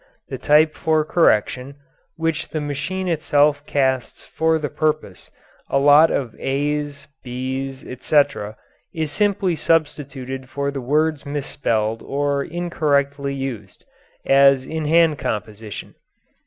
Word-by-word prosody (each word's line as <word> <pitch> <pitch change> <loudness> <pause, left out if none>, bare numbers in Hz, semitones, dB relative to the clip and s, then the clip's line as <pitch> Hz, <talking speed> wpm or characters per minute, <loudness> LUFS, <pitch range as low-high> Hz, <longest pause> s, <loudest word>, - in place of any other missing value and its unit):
The - - -5
type 155 +1 +4
for 155 -1 +1
correction, 135 -4 +1 0.4
which 165 -1 -2
the 155 - -3
machine 150 +6 -3
itself 145 -3 +2
casts 130 -4 -1
for 160 0 +1
the 150 -1 -3
purpose 150 -9 -2 0.4
a - - +2
lot 145 +3 +6
of 120 -5 -2
a's, 145 +1 -2 0.2
b's, 130 +1 -4
etc. 130 -4 0 0.4
is 160 -2 -2
simply 200 -1 +1
substituted 135 -5 -2
for 140 +1 -2
the 140 -1 -5
words 150 +3 +1
misspelled 115 -6 -2
or 140 0 -1
incorrectly 140 -5 -1
used, 120 -8 -6 0.4
as 135 -1 +5
in 160 +1 -4
hand 165 -2 +4
composition. 105 0 -5
145 Hz, 115 wpm, -21 LUFS, 135-155 Hz, 0.4 s, lot